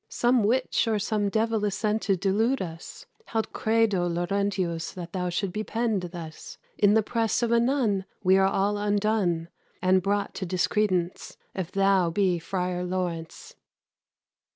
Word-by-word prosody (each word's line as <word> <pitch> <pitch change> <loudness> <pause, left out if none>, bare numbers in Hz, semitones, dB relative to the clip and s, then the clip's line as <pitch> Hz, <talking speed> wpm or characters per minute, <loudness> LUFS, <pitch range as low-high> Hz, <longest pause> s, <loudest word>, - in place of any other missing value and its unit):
Some 240 -1 +2
witch 250 +2 +1
or 220 -1 +2
some 205 0 0
divell 220 0 0
is 205 -2 0
sent 215 0 0
to 195 -2 +1
delude 215 +8 +1
us: 165 -2 -7 0.2
Haud 225 -1 -2
credo 220 -5 +2
Laurentius 175 -1 -1
that 175 -2 -8
thou 180 -1 -1
shouldst 180 +1 -2
be 215 - -2
pen'd 225 -3 -1
thus 165 -3 -9 0.2
In 205 0 +4
the 220 - +4
presse 225 +1 0
of 235 - +1
a 235 - +5
nun; 230 -6 +1 0.2
we 185 0 +5
are 190 - +4
all 200 +2 0
undone, 205 -5 0 0.3
And 185 0 +3
brought 200 +2 -1
to 190 - -4
discredence, 185 0 0 0.2
if 185 -2 -4
thou 195 -3 +3
be 180 0 +1
Frier 180 +1 -2
Laurence." 175 -3 -4
195 Hz, 155 wpm, -26 LUFS, 180-215 Hz, 0.3 s, a